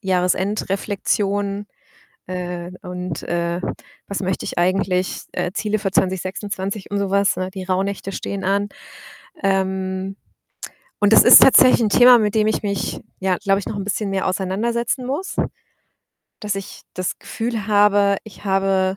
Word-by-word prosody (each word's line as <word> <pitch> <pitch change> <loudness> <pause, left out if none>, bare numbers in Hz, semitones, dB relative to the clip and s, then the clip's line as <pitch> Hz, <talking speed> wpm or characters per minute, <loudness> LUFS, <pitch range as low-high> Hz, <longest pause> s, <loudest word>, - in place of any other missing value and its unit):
Jahresendreflexion, 200 +1 -1 0.6
äh, 180 -1 -5
und, 180 -3 -5
äh, 170 0 -2 0.5
was 200 - -4
möchte 185 0 -2
ich - - -4
eigentlich, 185 +1 0
äh, 180 - -2
Ziele 215 +1 -1
für 195 -2 -1
2026 190 +2 -2
und 205 - -1
so 195 -1 -2
was, 200 0 +2
ne? 185 0 -3
Die 190 -1 -7
Rauhnächte 195 +1 -2
stehen 195 0 -5
an. 200 +2 +1 0.7
Ähm, 190 0 -1 0.8
und 205 +1 +4
das - - +8
ist - - +10
tatsächlich 255 -2 +7
'n 215 - +2
Thema, 245 +3 +7
mit 210 -1 0
dem 215 -1 +3
ich 220 - 0
mich, 200 -1 -2 0.2
ja, 190 -2 0
glaube 195 -1 +1
ich, 195 - -7
noch - - -4
'n 200 - -3
bisschen 200 0 -2
mehr 195 -1 -1
auseinandersetzen 230 +7 -1
muss, 290 +9 -4 1.1
dass 210 -1 -2
ich 195 -1 -7
das 185 -1 -3
Gefühl 225 -2 -4
habe, 205 -1 +4
ich 215 -1 -14
habe 195 0 +1
195 Hz, 150 wpm, -20 LUFS, 185-205 Hz, 1.1 s, ist